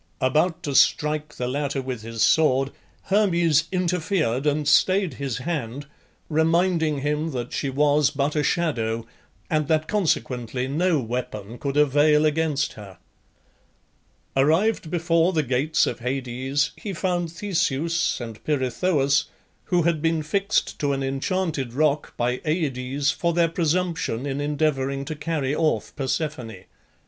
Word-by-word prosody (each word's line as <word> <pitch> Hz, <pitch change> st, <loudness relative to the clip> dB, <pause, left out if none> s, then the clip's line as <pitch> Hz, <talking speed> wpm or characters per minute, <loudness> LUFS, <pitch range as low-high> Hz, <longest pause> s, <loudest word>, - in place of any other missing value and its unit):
About 160 Hz, +6 st, +1 dB
to 145 Hz, -, -3 dB
strike 150 Hz, +1 st, +2 dB
the 125 Hz, -, -3 dB
latter 140 Hz, +1 st, -2 dB
with 130 Hz, -3 st, -4 dB
his 115 Hz, 0 st, -2 dB
sword, 135 Hz, -3 st, +3 dB, 0.3 s
Hermes 175 Hz, -6 st, +3 dB
interfered 175 Hz, -, 0 dB
and 150 Hz, 0 st, 0 dB
stayed 185 Hz, +4 st, +3 dB
his 135 Hz, -5 st, -4 dB
hand, 140 Hz, -2 st, -4 dB, 0.4 s
reminding 160 Hz, -1 st, +2 dB
him 150 Hz, +3 st, -1 dB
that 125 Hz, -1 st, -4 dB
she 140 Hz, -, -1 dB
was 145 Hz, +1 st, +3 dB
but 145 Hz, +1 st, -1 dB
a 150 Hz, -, +2 dB
shadow, 115 Hz, -9 st, 0 dB, 0.4 s
and 155 Hz, -2 st, 0 dB
that 155 Hz, 0 st, +1 dB
consequently 130 Hz, -, -1 dB
no 160 Hz, +3 st, +1 dB
weapon 115 Hz, -2 st, -5 dB
could 140 Hz, 0 st, -2 dB
avail 150 Hz, +1 st, +4 dB
against 150 Hz, -1 st, 0 dB
her. 100 Hz, -4 st, -11 dB, 1.4 s
Arrived 160 Hz, +7 st, +2 dB
before 170 Hz, +1 st, +2 dB
the 155 Hz, -2 st, +1 dB
gates 135 Hz, +5 st, +1 dB
of -, -, -3 dB
Hades 130 Hz, +3 st, -1 dB
he 205 Hz, -, -6 dB
found 175 Hz, -2 st, -1 dB
Theseus 170 Hz, -3 st, 0 dB
and 115 Hz, -3 st, -8 dB
Pirithoeus, 140 Hz, +1 st, +1 dB, 0.4 s
who 175 Hz, -2 st, +2 dB
had 165 Hz, -2 st, +1 dB
been 165 Hz, -1 st, +1 dB
fixed 195 Hz, +7 st, 0 dB
to 145 Hz, -1 st, +1 dB
an 135 Hz, 0 st, -2 dB
enchanted 135 Hz, -1 st, -2 dB
rock 150 Hz, +1 st, 0 dB
by 125 Hz, +1 st, -1 dB
Aides 140 Hz, -3 st, 0 dB
for 170 Hz, -1 st, -1 dB
their 170 Hz, 0 st, +3 dB
presumption 165 Hz, -6 st, -1 dB
in 140 Hz, 0 st, -2 dB
endeavouring 140 Hz, -2 st, -1 dB
to 155 Hz, +2 st, -5 dB
carry 150 Hz, -3 st, -2 dB
off 155 Hz, -1 st, 0 dB
Persephone. 130 Hz, -, -3 dB
150 Hz, 135 wpm, -24 LUFS, 135-165 Hz, 1.4 s, avail